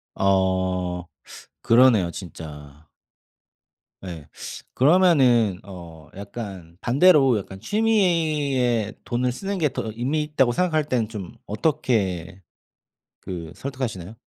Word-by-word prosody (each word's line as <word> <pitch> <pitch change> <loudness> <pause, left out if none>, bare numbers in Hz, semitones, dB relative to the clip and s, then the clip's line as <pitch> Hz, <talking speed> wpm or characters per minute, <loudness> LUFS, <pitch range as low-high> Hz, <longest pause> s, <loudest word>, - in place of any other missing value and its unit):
아 95 -2 +1 0.6
그러네요 115 -7 +5
진짜. 75 -5 -10 1.1
네. 85 -6 -8 0.5
그러면은 130 - +4
어 85 -5 -11
약간 100 -5 -8
반대로 135 -2 +5
약간 95 -1 -9
'취미에 155 - +1
돈을 125 +1 0
쓰는 195 +10 -4
게 155 -3 +2
더 110 - -4
의미 140 +6 -1
있다.'고 150 -5 +1
생각할 155 +2 +1
때는 125 -6 -1
좀 105 -5 -7
어떻게 100 - -1 0.8
그 85 -4 -7
설득하시나요? 115 -8 -5
115 Hz, 210 characters per minute, -23 LUFS, 90-140 Hz, 1.1 s, 그러네요